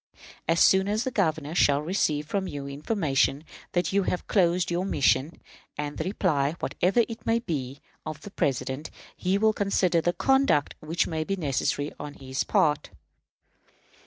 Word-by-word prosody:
As 165 Hz, +1 st, +2 dB
soon 190 Hz, 0 st, +5 dB
as 215 Hz, +3 st, 0 dB
the 260 Hz, -, -2 dB
Governor 160 Hz, -, 0 dB
shall 145 Hz, -4 st, +3 dB
receive 150 Hz, -4 st, 0 dB
from 190 Hz, +4 st, -2 dB
you 145 Hz, -3 st, -6 dB
information 145 Hz, -2 st, 0 dB, 0.3 s
that 175 Hz, +1 st, 0 dB
you 200 Hz, -, +3 dB
have 180 Hz, -1 st, -2 dB
closed 180 Hz, -2 st, +2 dB
your 175 Hz, +1 st, 0 dB
mission, 140 Hz, -, +1 dB, 0.4 s
and 145 Hz, 0 st, -4 dB
the -, -, 0 dB
reply, 155 Hz, -7 st, 0 dB
whatever 195 Hz, +7 st, +1 dB
it 225 Hz, -1 st, -8 dB
may 225 Hz, -, +2 dB
be, 145 Hz, -, -4 dB, 0.2 s
of 155 Hz, -2 st, -6 dB
the 205 Hz, -, -10 dB
President, 135 Hz, +1 st, -2 dB, 0.3 s
he 185 Hz, +2 st, 0 dB
will 220 Hz, +1 st, +3 dB
consider 190 Hz, -4 st, +1 dB
the 175 Hz, +2 st, +1 dB
conduct 265 Hz, -, +2 dB
which 160 Hz, +2 st, 0 dB
may 160 Hz, -2 st, -2 dB
be 195 Hz, +5 st, -2 dB
necessary 145 Hz, -2 st, -1 dB
on 145 Hz, 0 st, -7 dB
his 130 Hz, -1 st, -3 dB
part." 150 Hz, -1 st, +1 dB
165 Hz, 160 wpm, -26 LUFS, 145-195 Hz, 0.4 s, soon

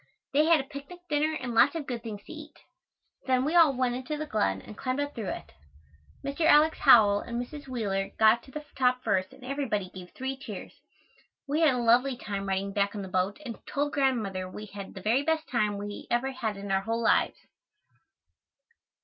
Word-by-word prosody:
They 300 Hz, +2 st, +4 dB
had 330 Hz, -1 st, +5 dB
a -, -, -2 dB
picnic 285 Hz, +5 st, -10 dB
dinner 305 Hz, +1 st, +1 dB
and 245 Hz, -2 st, -4 dB
lots 260 Hz, +7 st, +5 dB
of 320 Hz, -3 st, -3 dB
good 245 Hz, -3 st, -4 dB
things 210 Hz, -3 st, -7 dB
to -, -, -10 dB
eat. 305 Hz, -1 st, -11 dB, 0.7 s
Then 255 Hz, 0 st, +2 dB
we 305 Hz, -, 0 dB
all 330 Hz, -4 st, +7 dB
went 250 Hz, -1 st, +1 dB
into 260 Hz, +5 st, -4 dB
the 310 Hz, -, -3 dB
glen 95 Hz, -, 0 dB
and 210 Hz, -, -11 dB
climbed 255 Hz, +4 st, -2 dB
up 285 Hz, 0 st, -2 dB
through 215 Hz, -5 st, -4 dB
it. 75 Hz, -2 st, -6 dB, 0.7 s
Mr. 280 Hz, +4 st, -2 dB
Alex. 315 Hz, 0 st, +5 dB
Howell 210 Hz, -7 st, +7 dB
and 235 Hz, +3 st, -4 dB
Mrs. 285 Hz, +4 st, -7 dB
Wheeler 200 Hz, -6 st, -2 dB
got 220 Hz, +2 st, +5 dB
to -, -, -17 dB
the 300 Hz, +2 st, -7 dB
top 250 Hz, -1 st, +2 dB
first 185 Hz, -1 st, 0 dB
and 260 Hz, -, -14 dB
everybody 245 Hz, -9 st, -2 dB
gave 180 Hz, -1 st, -10 dB
three 265 Hz, +1 st, -4 dB
cheers. 270 Hz, +3 st, -8 dB, 0.7 s
We 295 Hz, +3 st, 0 dB
had 300 Hz, -5 st, +5 dB
a -, -, -1 dB
lovely 245 Hz, +2 st, +3 dB
time 200 Hz, -3 st, -4 dB
riding 195 Hz, +1 st, -1 dB
back 200 Hz, 0 st, 0 dB
on 205 Hz, -, -4 dB
the 190 Hz, -, -7 dB
boat 185 Hz, +2 st, 0 dB
and 235 Hz, -3 st, -6 dB
told 290 Hz, +1 st, -1 dB
Grandmother 215 Hz, -10 st, 0 dB
we 210 Hz, +3 st, -8 dB
had 200 Hz, -1 st, -9 dB
the 190 Hz, -, -7 dB
very 230 Hz, +7 st, +2 dB
best 320 Hz, +1 st, 0 dB
time 210 Hz, -4 st, 0 dB
we 205 Hz, 0 st, -7 dB
ever 245 Hz, +3 st, 0 dB
had 225 Hz, -6 st, -3 dB
in 200 Hz, 0 st, -6 dB
our 190 Hz, 0 st, +2 dB
whole 230 Hz, +3 st, -2 dB
lives. -, -, +3 dB
245 Hz, 210 wpm, -28 LUFS, 205-280 Hz, 0.7 s, all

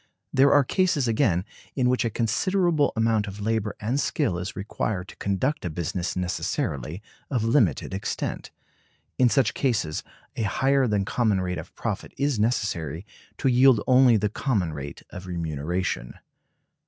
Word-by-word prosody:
There 135 Hz, +1 st, +5 dB
are 145 Hz, -, +6 dB
cases, 160 Hz, -3 st, +1 dB
again, 110 Hz, -, +2 dB, 0.3 s
in 130 Hz, -3 st, +2 dB
which 125 Hz, 0 st, +2 dB
a 115 Hz, -, 0 dB
considerable 155 Hz, -, +1 dB
amount 110 Hz, -2 st, +1 dB
of 100 Hz, +1 st, -7 dB
labor 110 Hz, 0 st, -1 dB
and 120 Hz, +6 st, -1 dB
skill 125 Hz, -, 0 dB
is 90 Hz, +3 st, -5 dB
required 100 Hz, -1 st, -3 dB
to -, -, -12 dB
conduct 130 Hz, +10 st, -1 dB
a 90 Hz, -, -2 dB
business 85 Hz, +2 st, -3 dB
necessarily 90 Hz, -, -2 dB, 0.3 s
of 125 Hz, -6 st, 0 dB
limited 115 Hz, -, +2 dB
extent. 95 Hz, -, -3 dB, 0.7 s
In 125 Hz, -1 st, +5 dB
such 135 Hz, +1 st, +2 dB
cases 110 Hz, -, 0 dB, 0.3 s
a -, -, -3 dB
higher 135 Hz, +5 st, +2 dB
than 105 Hz, -3 st, +1 dB
common 110 Hz, -2 st, +1 dB
rate 90 Hz, -1 st, -2 dB
of -, -, -11 dB
profit -, -, -4 dB
is 140 Hz, -4 st, 0 dB
necessary 95 Hz, -, -1 dB, 0.3 s
to -, -, 0 dB
yield 130 Hz, -1 st, +6 dB
only 130 Hz, -3 st, +6 dB
the 105 Hz, 0 st, +1 dB
common 105 Hz, -, -1 dB
rate 70 Hz, -1 st, -7 dB
of 90 Hz, +1 st, -8 dB
remuneration. 80 Hz, -5 st, -3 dB
110 Hz, 155 wpm, -25 LUFS, 90-130 Hz, 0.7 s, are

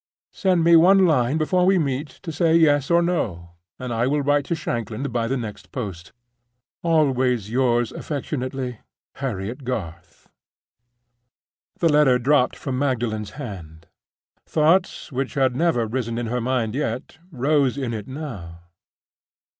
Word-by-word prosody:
Send 185 Hz, -3 st, +2 dB
me 170 Hz, 0 st, +6 dB
one 190 Hz, +3 st, +6 dB
line 140 Hz, -3 st, +2 dB
before 180 Hz, +3 st, +1 dB
we 190 Hz, +1 st, +4 dB
meet 145 Hz, -2 st, -1 dB, 0.2 s
to 170 Hz, -, -4 dB
say 160 Hz, +1 st, +2 dB
Yes 145 Hz, -4 st, +4 dB
or 170 Hz, 0 st, +4 dB
No, 95 Hz, -, -2 dB, 0.3 s
and 125 Hz, -2 st, -5 dB
I 115 Hz, +2 st, +1 dB
will 145 Hz, +1 st, +1 dB
write 145 Hz, 0 st, +2 dB
to 170 Hz, -, -1 dB
Shanklin 115 Hz, -5 st, -4 dB
by 120 Hz, -4 st, -1 dB
the 135 Hz, +3 st, -1 dB
next 110 Hz, -4 st, -7 dB
post. 95 Hz, -8 st, -6 dB, 0.7 s
"Always 130 Hz, -, +1 dB
yours 120 Hz, -2 st, +1 dB
affectionately, 130 Hz, -4 st, -4 dB, 0.4 s
"HARRIET 120 Hz, 0 st, -4 dB
GARTH" 85 Hz, -9 st, -6 dB, 1.5 s
The 165 Hz, -3 st, +2 dB
letter 145 Hz, -4 st, +5 dB
dropped 130 Hz, +1 st, +2 dB
from 130 Hz, -2 st, -4 dB
Magdalen's 115 Hz, -7 st, -1 dB
hand. 85 Hz, -, -8 dB, 0.6 s
Thoughts 165 Hz, +4 st, +1 dB
which 135 Hz, 0 st, -3 dB
had 130 Hz, -3 st, +2 dB
never 160 Hz, -7 st, +1 dB
risen 115 Hz, 0 st, -3 dB
in 120 Hz, -, -2 dB
her 120 Hz, +2 st, -2 dB
mind 120 Hz, -3 st, -1 dB
yet 130 Hz, +1 st, -4 dB
rose 140 Hz, -2 st, +1 dB
in 130 Hz, -4 st, -2 dB
it 105 Hz, -2 st, -5 dB
now. 110 Hz, -, -7 dB
130 Hz, 140 wpm, -23 LUFS, 115-150 Hz, 1.5 s, me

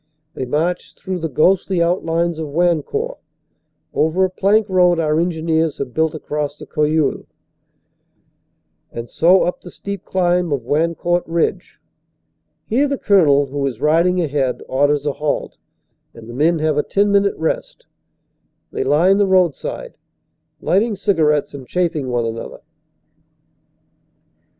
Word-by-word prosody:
They 130 Hz, -, -4 dB
march 165 Hz, +7 st, -2 dB
through 185 Hz, -1 st, -5 dB
the 165 Hz, -1 st, -3 dB
ghostly 185 Hz, +5 st, +2 dB
outlines 170 Hz, -1 st, 0 dB
of 160 Hz, -, -3 dB
Wan 170 Hz, +2 st, +1 dB
court, 475 Hz, -, -4 dB, 0.7 s
over 160 Hz, +5 st, +1 dB
a 185 Hz, -, -3 dB
plank 205 Hz, +3 st, +2 dB
road 180 Hz, -3 st, +3 dB
our 155 Hz, -1 st, +1 dB
engineers 160 Hz, -2 st, 0 dB
have 130 Hz, -3 st, -5 dB
built 160 Hz, 0 st, 0 dB
across 150 Hz, -1 st, -4 dB
the -, -, -10 dB
Cojeul, 150 Hz, 0 st, 0 dB, 1.6 s
and 115 Hz, 0 st, -7 dB
so 180 Hz, +3 st, +4 dB
up 180 Hz, -, -2 dB
the 180 Hz, -, -11 dB
steep 200 Hz, +2 st, -7 dB
climb 180 Hz, -2 st, 0 dB
of 140 Hz, -4 st, -1 dB
Wancourt 170 Hz, +4 st, 0 dB
Ridge. 165 Hz, 0 st, -2 dB, 0.9 s
Here 265 Hz, +6 st, +1 dB
the 280 Hz, 0 st, -2 dB
Colonel, 150 Hz, -, +4 dB
who 140 Hz, +1 st, -4 dB
is 120 Hz, -4 st, -5 dB
riding 170 Hz, +5 st, +2 dB
ahead, 140 Hz, -6 st, -1 dB
orders 145 Hz, +2 st, +1 dB
a 145 Hz, -, 0 dB
halt, 150 Hz, 0 st, -3 dB, 0.6 s
and 115 Hz, -1 st, -12 dB
the 120 Hz, -, -9 dB
men 160 Hz, +6 st, +2 dB
have 155 Hz, -1 st, 0 dB
a -, -, +4 dB
ten 200 Hz, +1 st, +1 dB
minute 200 Hz, 0 st, +2 dB
rest. 160 Hz, 0 st, -3 dB, 0.9 s
They -, -, -2 dB
line 170 Hz, +8 st, +3 dB
the 200 Hz, -, +3 dB
roadside, 180 Hz, -6 st, 0 dB, 0.6 s
lighting 210 Hz, +4 st, +1 dB
cigar 190 Hz, -5 st, +1 dB
ettes 150 Hz, -1 st, -1 dB
and 135 Hz, -3 st, -9 dB
chaffing 170 Hz, -6 st, -1 dB
one 120 Hz, -1 st, 0 dB
another. 115 Hz, 0 st, -6 dB
165 Hz, 140 wpm, -19 LUFS, 150-180 Hz, 1.6 s, so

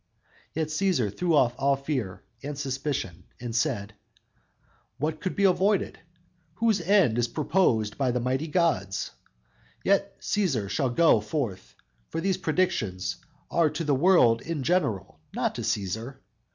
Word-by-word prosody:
Yet, 160 Hz, -1 st, -1 dB
Cæsar 155 Hz, -, 0 dB
threw 175 Hz, -3 st, +1 dB
off 125 Hz, -4 st, +4 dB
all 140 Hz, +1 st, +3 dB
fear 135 Hz, -9 st, -4 dB, 0.2 s
and 145 Hz, 0 st, -5 dB
suspicion 130 Hz, -, -3 dB
and 120 Hz, -2 st, -5 dB
said: 115 Hz, -6 st, -1 dB, 1.0 s
_"What 155 Hz, +3 st, -2 dB
can 185 Hz, -, -3 dB
be 200 Hz, -, 0 dB
avoided, 195 Hz, +1 st, +2 dB, 0.6 s
Whose 220 Hz, -1 st, +2 dB
end 170 Hz, -, +3 dB
is 120 Hz, -, +2 dB
purposed 125 Hz, -, +1 dB
by 135 Hz, -2 st, +2 dB
the 125 Hz, 0 st, 0 dB
mighty 130 Hz, +5 st, -1 dB
gods? 150 Hz, -, 0 dB, 0.7 s
Yet 200 Hz, 0 st, +1 dB
Cæsar 135 Hz, -, 0 dB
shall 130 Hz, +5 st, +1 dB
go 140 Hz, -1 st, +4 dB
forth, 105 Hz, -4 st, -4 dB, 0.3 s
for -, -, -3 dB
these 190 Hz, +2 st, 0 dB
predictions 115 Hz, -, -1 dB, 0.3 s
Are 165 Hz, -2 st, +3 dB
to 155 Hz, +3 st, -4 dB
the 145 Hz, -2 st, +1 dB
world 135 Hz, -7 st, +5 dB
in 160 Hz, -4 st, -4 dB
general, 110 Hz, -, 0 dB, 0.2 s
not -, -, 0 dB
to -, -, -5 dB
Cæsar! 115 Hz, +4 st, -2 dB
140 Hz, 140 wpm, -27 LUFS, 115-170 Hz, 1.0 s, world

